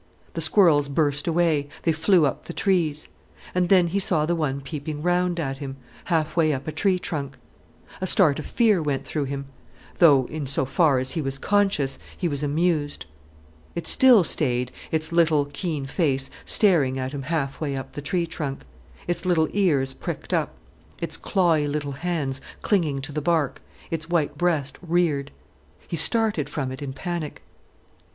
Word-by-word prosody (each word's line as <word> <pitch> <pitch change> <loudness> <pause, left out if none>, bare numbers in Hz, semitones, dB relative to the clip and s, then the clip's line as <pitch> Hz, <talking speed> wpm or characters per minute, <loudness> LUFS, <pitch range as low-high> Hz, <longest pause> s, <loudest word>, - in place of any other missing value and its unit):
The - - -3
squirrels 155 -8 +4
burst 145 0 0
away—they 165 -2 +1
flew 165 +1 +3
up 140 - -2
the - - -7
trees. 165 -7 0 0.5
And 180 -1 +1
then 185 -3 +6
he 195 +4 0
saw 170 -5 +1
the 170 - 0
one 145 -4 -1
peeping 150 +2 -6
round 180 0 +1
at 135 -4 -3
him, 135 -2 -6 0.3
half 160 -3 0
way 160 -3 +3
up 135 +2 -5
a - - -1
tree 185 +4 +1
trunk. 140 -6 -5 0.6
A 185 - -1
start 160 -6 +4
of 155 - -6
fear 215 -7 +3
went 140 -3 -2
through 145 +1 -2
him, 140 0 -4 0.5
though, 145 -7 +6
in 150 -1 -5
so 135 0 +2
far 145 0 +3
as 130 +1 -1
he 165 - -1
was 135 -1 -3
conscious, 195 -6 +1 0.2
he 180 - -1
was 145 -3 -3
amused. 150 0 0 0.7
It 170 - -4
still 250 -7 +6
stayed, 125 -6 0 0.2
its 155 0 -1
little, 160 -4 +3
keen 155 -7 -3
face 135 -2 -1
staring 155 -11 +3
at 130 0 -3
him 140 -1 -5
halfway 140 -1 -2
up 135 - -6
the 145 - -7
tree 170 +4 -1
trunk, 145 -4 -5 0.4
its 175 - -2
little 170 -4 +2
ears 145 -10 +2
pricked - - -6
up, - - 0 0.4
its - - 0
clawey 165 -6 +1
little 145 0 -2
hands 140 -3 -2 0.2
clinging 155 -9 +1
to 140 +2 -6
the 150 +1 -3
bark, 155 -4 0 0.3
its 165 0 -3
white 170 -4 0
breast 155 -6 -1
reared. 165 -5 0 0.6
He - - -3
started 205 - +3
from 135 -4 -3
it 130 - -8
in 140 -2 -4
panic. 170 +2 -5
155 Hz, 170 wpm, -24 LUFS, 140-175 Hz, 0.7 s, then